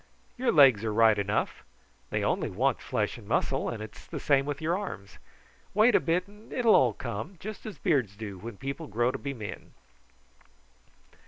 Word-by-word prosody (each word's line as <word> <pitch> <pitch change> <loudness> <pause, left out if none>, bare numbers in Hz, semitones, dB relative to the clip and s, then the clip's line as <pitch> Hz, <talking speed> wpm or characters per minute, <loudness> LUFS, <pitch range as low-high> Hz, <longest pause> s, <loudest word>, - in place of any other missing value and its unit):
"Your 255 0 +1
legs 135 -8 +6
are 110 - -1
right 110 0 +5
enough. 100 +1 -1 0.5
They - - -1
only - - 0
want - - 0
flesh - - -2
and - - -14
muscle, - - 0
and 110 -2 -5
it's 110 - -11
the - - -5
same 140 -1 +2
with 145 -1 -3
your 165 +2 0
arms. 145 - -6 0.6
Wait 220 +3 +5
a - - +6
bit 175 +3 0
and 210 +2 -17
it 250 - -2
will 225 - +7
all 120 -4 +5
come, 120 - -5
just 215 +2 -7
as 215 - -7
beards 130 - +1
do 100 -3 -7
when 115 +1 -8
people 140 +6 -5
grow 120 +1 +1
to - - -5
be 140 -1 -4
men." 110 -4 -8
135 Hz, 190 wpm, -28 LUFS, 110-180 Hz, 0.6 s, will